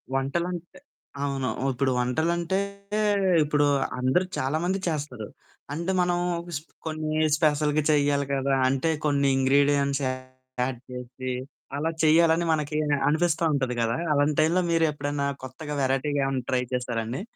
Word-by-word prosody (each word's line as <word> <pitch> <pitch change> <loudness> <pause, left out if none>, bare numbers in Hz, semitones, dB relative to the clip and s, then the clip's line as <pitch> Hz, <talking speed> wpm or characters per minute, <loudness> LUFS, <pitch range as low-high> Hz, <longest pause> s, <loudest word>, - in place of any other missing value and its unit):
వంటలంటే 170 - -2 0.5
అవును. 135 -2 -1 0.2
ఇప్పుడు 130 +1 0
వంటలంటే 165 +8 0 0.9
ఇప్పుడు 145 0 +2 0.3
అందరూ 130 +9 +2
చాలా 135 +4 0
మంది 190 +2 0
చేస్తారు 145 -9 -3 0.5
అంటే 170 +4 -2
మనం 175 0 +1 0.4
స్పె 155 +3 -13
కొన్ని 155 -1 -2 0.2
స్పెషల్‌గా 150 -1 +2
చెయ్యాలి 145 -1 +2
కదా! 135 0 0
అంటే 135 +5 +1 0.2
కొన్ని 140 -1 +2
ఇంగ్రీడియెంట్స్ 140 +1 +3
యాడ్ 130 -1 -4
చేసి, 125 +1 -6 0.5
అలా 160 +3 0
చేయాలని 165 +2 +4
మనకి 150 -1 -1 0.3
అనిపిస్తా 165 +2 +1
ఉంటది 130 -3 0
కదా! 115 +1 0 0.2
అలాంటి 145 +1 +2
టైమ్‌లో 170 +4 +3
మీరు 165 -1 +3
ఎప్పుడైనా 145 -1 -2 0.2
కొత్తగా 145 +3 -6
వెరైటీగా 135 +2 +1
ఏమన్నా 130 -2 -2
ట్రై 125 -1 +2
చేసారా 125 -2 -1
అండి? 125 +9 -4
145 Hz, 130 wpm, -26 LUFS, 130-155 Hz, 0.9 s, చేయాలని